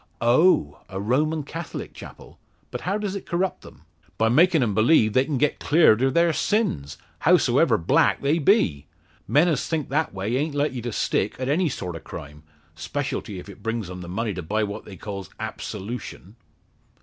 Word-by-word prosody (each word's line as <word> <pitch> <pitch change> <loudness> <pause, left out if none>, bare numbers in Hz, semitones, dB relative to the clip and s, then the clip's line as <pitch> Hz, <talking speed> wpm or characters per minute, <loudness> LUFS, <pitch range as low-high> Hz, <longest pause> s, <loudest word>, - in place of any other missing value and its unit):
"Oh! 120 - +3
A 95 - -5
Roman 150 +9 0
Catholic 165 +3 -7
chapel. - - -12 0.3
But - - -5
how 195 +3 -1
does 205 -2 -3
it 200 - -7
corrupt 180 +2 -1
them?" 75 - -15 0.3
"By 115 - +2
makin' 160 +3 +4
'em 105 -4 0
believe 110 0 +4
they 130 +1 +3
can 145 -2 -2
get 150 +2 +1
cleared 145 -8 +4
of 135 0 +1
their 170 -1 +4
sins, 115 - -1 0.2
hows'ever 140 -6 +4
black 80 - +2
they 145 +4 +1
be. 135 - +2 0.4
Men 150 +5 +4
as 150 -7 0
think 160 -3 -2
that 155 +3 0
way 100 +6 -2
a'nt 145 +1 -2
like 145 0 0
to 120 +1 -4
stick - - 0
at 130 +1 -3
any 165 +3 +2
sort 90 -9 -5
of 80 - -9
crime 75 +1 -9 0.3
'specialty 125 - -4
if 90 - -9
it 100 - -12
brings 115 -5 -3
'em 90 0 -7
the 85 - -8
money 105 +3 -2
to 90 - -5
buy 105 +7 -1
what 105 +1 -5
they 95 - -10
calls 100 -3 -7
absolution." 105 -1 -6
125 Hz, 185 wpm, -24 LUFS, 100-160 Hz, 0.4 s, makin